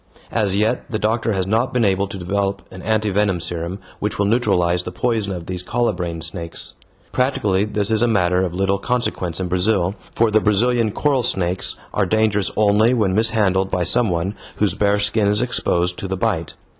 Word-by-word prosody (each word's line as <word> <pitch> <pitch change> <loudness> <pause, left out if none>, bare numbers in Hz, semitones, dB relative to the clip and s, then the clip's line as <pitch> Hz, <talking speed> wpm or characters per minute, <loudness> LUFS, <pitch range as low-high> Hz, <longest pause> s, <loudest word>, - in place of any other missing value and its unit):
As 100 -4 0
yet 105 +2 0
the 110 - -1
doctor 110 +1 0
has 95 -2 -1
not 110 +6 +1
been 120 -3 +3
able 100 0 +1
to 100 0 -7
develop 100 +2 -2
an 90 - -9
anti 110 0 0
venom 100 -2 +1
serum 85 +2 -3 0.2
which 105 - -2
will 100 - +1
neutralize 95 -6 +2
the 90 - -6
poison 110 +1 -1
of 90 -3 -5
these 90 0 -4
colubrine 90 -6 -2
snakes. 85 0 -4 0.4
Practically 105 -7 +1
this 105 0 -1
is 110 -1 +3
a 120 - +4
matter 90 -4 +2
of 90 - -1
little 95 +1 +1
consequence 100 -8 -1
in 95 - -2
Brazil, 90 0 +1 0.2
for 115 -1 +3
the 110 - +4
Brazilian 115 +2 +2
coral 135 +4 +1
snakes 95 -6 -1 0.2
are 100 -2 +1
dangerous 105 -1 +1
only 110 +3 +4
when 105 -5 +1
mishandled 100 -3 +2
by 90 -2 0
some 120 +5 +2
one 90 +3 -1 0.2
whose 105 -4 +2
bare 100 0 +2
skin 105 0 +2
is 105 +1 +2
exposed 90 -7 0
to 95 - -4
the 95 0 -3
bite. - - -1
100 Hz, 195 wpm, -20 LUFS, 90-110 Hz, 0.4 s, a